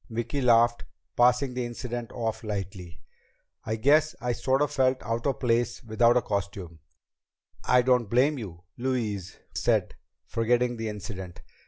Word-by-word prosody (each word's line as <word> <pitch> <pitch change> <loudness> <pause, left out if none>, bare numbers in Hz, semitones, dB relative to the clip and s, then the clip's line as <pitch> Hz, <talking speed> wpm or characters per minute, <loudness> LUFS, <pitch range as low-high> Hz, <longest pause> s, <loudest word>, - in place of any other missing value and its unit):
Vicki 120 +4 -3
laughed, 120 -1 +4 0.3
passing 125 +2 +3
the 125 0 -2
incident 120 0 -5
off 110 -1 -3
lightly. 95 -4 -6 0.6
"I 110 - -2
guess 150 +7 +3
I 125 - -1
sort 130 +4 +1
of 145 - -1
felt 130 -2 +2
out 115 +3 -2
of 135 - -1
place 120 -1 0
without 115 +2 +3
a 120 - +1
costume." 100 -5 -4 0.8
"I 125 0 +4
don't 125 -4 +2
blame 135 +5 +3
you," 90 -6 -8 0.2
Louise 110 -7 -2 0.2
said, - - +1 0.3
forgetting 120 +1 +1
the 115 -1 -3
incident. 95 -4 -7
120 Hz, 145 wpm, -27 LUFS, 110-125 Hz, 0.8 s, laughed